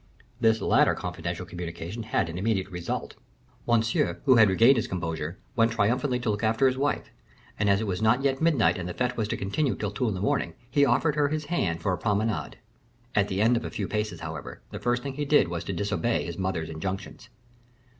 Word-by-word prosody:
This 110 -2 +3
latter - - +4
confidential 90 0 -4
communication 85 +4 -6
had 110 -5 0
an 85 +2 -5
immediate 100 -2 0
result. 90 -1 -4 0.5
Monsieur, 110 -7 +1
who 130 -3 +6
had 110 -3 +7
regained 115 +8 +5
his 115 - 0
composure, 80 -2 -4 0.2
went 115 -1 +3
triumphantly 125 +4 +1
to 115 - 0
look 105 0 -3
after 110 +4 +2
his 130 -1 +3
wife, 140 +2 -1 0.5
and 105 -1 +2
it 100 +3 +2
was 95 -1 -2
not 115 +5 +3
yet 135 0 +1
midnight 145 - +3
and 90 0 -4
the 90 - -6
fete 125 0 -1
was 110 -2 -1
to - - -2
continue 125 +8 0
until 105 -1 -3
two 110 +5 -1
in 105 - -1
the - - -4
morning, 85 -4 0 0.2
he 140 +2 +4
offered 150 +2 +2
her 145 -1 +2
his 155 +1 -2
hand 85 - 0
for 95 - +1
a - - -3
promenade. 105 +1 -1 0.6
At 100 -1 +2
the 100 +2 0
end 120 +2 +4
of 120 - -1
a - - -4
few 100 - -3
paces, 105 0 -3
however, 80 -3 -7
the - - -6
first 120 0 0
thing 140 -1 -4
he 145 +2 -3
did 145 - +4
was 85 -1 -3
to - - -3
disobey 100 +4 -1
his 85 - -5
mother's 95 -4 -2
injunctions. 95 +7 -5
105 Hz, 215 wpm, -27 LUFS, 90-120 Hz, 0.6 s, had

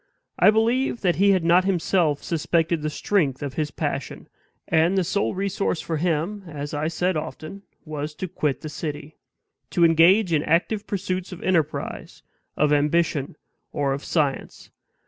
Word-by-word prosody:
I - - +7
believe 230 +4 +1
that 175 -5 +1
he 200 +2 +4
had 190 -3 +3
not 175 +2 +4
himself 175 -5 +1
suspected 165 0 0
the 155 - -1
strength 150 -5 0
of 140 -2 -4
his 150 0 -2
passion; 145 -3 -4 0.4
and 165 +4 +2
the 190 - +3
sole 200 +3 -1
resource 195 -2 -1
for 160 - -3
him, 175 +5 -1
as 145 -2 -6
I 150 +1 -1
said 180 +2 0
often, 155 +4 -6 0.2
was 150 -1 -5
to 185 - -4
quit 150 -4 -2
the 155 - -6
city 150 0 -6 0.5
to 170 - +3
engage 170 +4 +5
in 150 - +3
active 190 +7 0
pursuits 185 -2 -3
of 180 - -9
enterprise, 160 -5 -2 0.3
of 150 0 +3
ambition, 150 -1 +1 0.4
or 140 -2 0
of 140 - -5
science. 145 -5 -2
165 Hz, 160 wpm, -24 LUFS, 150-185 Hz, 0.5 s, I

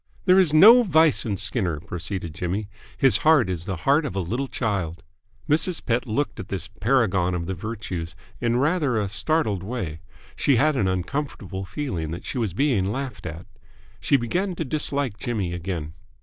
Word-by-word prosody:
"There 185 0 +6
is 180 -5 +4
no 215 +11 +9
vice 160 - +3
in 100 -3 -1
Skinner," 95 - -2
proceeded 90 0 -5
Jimmy. 90 +6 -3 0.3
"His 135 - +5
heart 150 -11 +4
is 85 -2 -4
the 95 -2 -3
heart 145 +4 +4
of 140 -9 -4
a - - 0
little 120 +10 -2
child." 100 -10 -3 0.4
Mrs. 160 +4 +1
Pett 120 +1 0
looked 115 +1 -2
at 95 - -6
this 95 -2 -4
paragon 100 -5 +1
of 85 -1 -3
the 95 - -3
virtues 95 -4 -5 0.2
in 120 0 +1
rather 145 -3 +1
a 105 -2 0
startled 110 - 0
way. 95 -7 -4 0.4
She 140 - +2
had 150 +5 +3
an 105 -7 +1
uncomfortable 95 -1 -3
feeling 95 - -4
that 85 +2 -6
she 130 - -3
was 110 -7 -1
being 110 -9 +1
laughed 130 -2 -5
at. 80 +3 -7 0.5
She 140 - +3
began 180 - -1
to 165 - -3
dislike 140 -6 -1
Jimmy 105 -8 -2
again. 85 -3 -4
110 Hz, 180 wpm, -24 LUFS, 90-140 Hz, 0.5 s, no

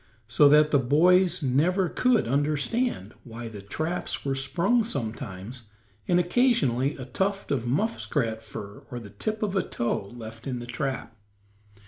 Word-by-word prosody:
So 130 +6 +5
that 150 +1 +5
the 140 - +5
boys 175 +6 +4
never 170 +9 +2
could 245 - +2
understand 145 - 0
why 115 -1 -7
the 105 -3 -9
traps 155 - -3
were 135 - 0
sprung 170 - +1
sometimes, 115 - -5 0.4
and 175 - +4
occasionally 175 - +2
a 130 - -7
tuft 195 +10 -2
of 125 -4 0
muskrat 130 - -1
fur, 100 -2 -9
or 125 -3 -5
the 105 -4 -11
tip 215 - -3
of 200 -2 -1
a 190 - +3
toe 115 -4 -2
left 115 +2 -9
in 130 -2 -2
the 120 - -6
trap. 125 -1 -4
140 Hz, 150 wpm, -26 LUFS, 115-180 Hz, 0.4 s, So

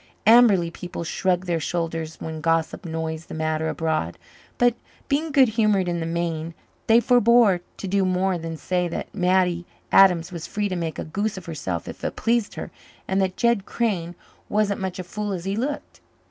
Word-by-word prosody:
Amberley 210 -7 +6
people 175 0 -6
shrugged 180 +2 0
their 170 -2 0
shoulders 165 -1 -3
when 160 -1 -6
gossip 165 +3 0
noised 160 0 -4
the - - -7
matter 155 0 -1
abroad. 160 - -1 0.4
But, 245 0 +4 0.3
being 300 +3 0
good 270 -3 +5
humoured 210 -4 +2
in 175 -1 -1
the 165 - -3
main, 165 -1 -3 0.3
they 225 +1 +7
forebore 235 -5 +5 0.2
to 195 - -5
do 195 +1 +2
more 185 0 +1
than 165 0 -5
say 180 +2 -1
that 170 - -5
Mattie 180 -2 +1 0.2
Adams 180 -3 +5
was 170 -3 -6
free 205 -1 -2
to 185 - -2
make 165 -2 -3
a - - -3
goose 200 +6 -2
of 185 - -8
herself 145 - -4
if - - -9
it - - -2
pleased 230 -2 0
her, - - -6 0.4
and 190 +1 +1
that 185 -1 -1
Jed 235 -4 +2
Crane 180 -7 -1 0.3
wasn't 205 -1 +1
such 190 -1 -3
a 185 - -4
fool 205 +3 -4
as 180 -1 -5
he 195 +1 -1
looked. 275 +6 -4
180 Hz, 190 wpm, -24 LUFS, 165-205 Hz, 0.4 s, they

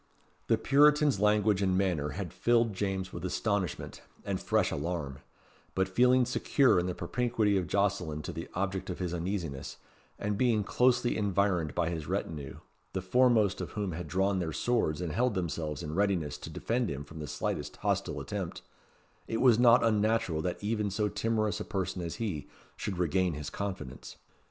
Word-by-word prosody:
The 115 - +4
Puritan's 145 0 +4
language 105 -1 +3
and 95 -1 +2
manner 90 -7 +1
had 95 -3 -4
filled 115 -2 +2
James 95 -1 -2
with 85 - -6
astonishment 95 -1 -2 0.2
and - - -2
fresh - - +1
alarm; 75 -3 -3 0.6
but 95 0 +2
feeling 125 +6 +4
secure 125 -2 +3
in 90 - -1
the 90 - -3
propinquity 110 +1 0
of 95 -2 0
Jocelyn 95 -7 0
to - - -4
the 80 +2 -6
object 95 +1 -2
of 90 - -3
his 90 -2 -3
uneasiness, 85 -5 -4 0.4
and 105 0 -2
being 115 -5 +3
closely 125 +2 +2
environed 100 -6 +1
by 85 -1 +1
his 80 -3 -4
retinue, 70 -4 -4 0.3
the 95 - -1
foremost 110 -1 +3
of - - -6
whom 100 -3 -2
had 85 0 -5
drawn 95 +4 +1
their 80 -3 -2
swords 100 -7 0
and 85 -3 -2
held 120 +4 +1
themselves 80 -4 -3
in 75 - -5
readiness 85 -6 0
to - - -8
defend 115 +9 -1
him 70 0 -4
from 80 +2 -11
the 75 - -5
slightest - - -3
hostile - - -1
attempt, - - -5 0.6
it 115 - -1
was 120 -3 +5
not 120 0 +6
unnatural 110 -7 +2
that 90 +4 -3
even 105 -1 0
so 105 +2 0
timorous 110 -1 0
a - - -3
person 95 -3 -3
as 85 -1 -4
he, 95 - -4 0.3
should 95 -3 -4
regain 90 0 +1
his 75 -1 -6
confidence. 95 -11 -6
95 Hz, 175 wpm, -30 LUFS, 85-110 Hz, 0.6 s, not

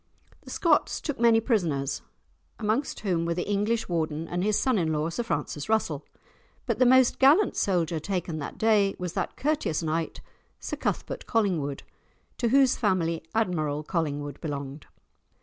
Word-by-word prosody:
The - - -13
Scots 325 -4 +2
took 295 -6 -4
many 230 -1 +5
prisoners, 160 - 0 0.6
amongst 225 +6 -1
whom 180 -5 0
were 170 0 -1
the 180 - -3
English 210 +3 0
Warden, 160 -2 -2
and 175 +1 -2
his 210 0 +2
son 255 -6 +2
in 160 -2 0
law, 155 +2 -1
Sir 170 - -2
Francis 150 -8 -3
Russell; 220 0 0 0.6
but - - -1
the 255 - +5
most 260 0 +5
gallant 300 +10 +5
soldier 170 -4 0
taken 175 -2 -3
that 145 - -6
day 210 -3 +3
was 180 -1 -4
that - - -3
courteous 290 - 0
knight, 160 +1 -2 0.4
Sir - - -5
Cuthbert - - -3
Collingwood, 175 - 0 0.6
to 240 - +1
whose 265 0 +4
family 175 -7 0
Admiral 155 -9 0
Collingwood 145 -4 -3
belonged. 145 -1 -5
180 Hz, 155 wpm, -27 LUFS, 155-225 Hz, 0.6 s, many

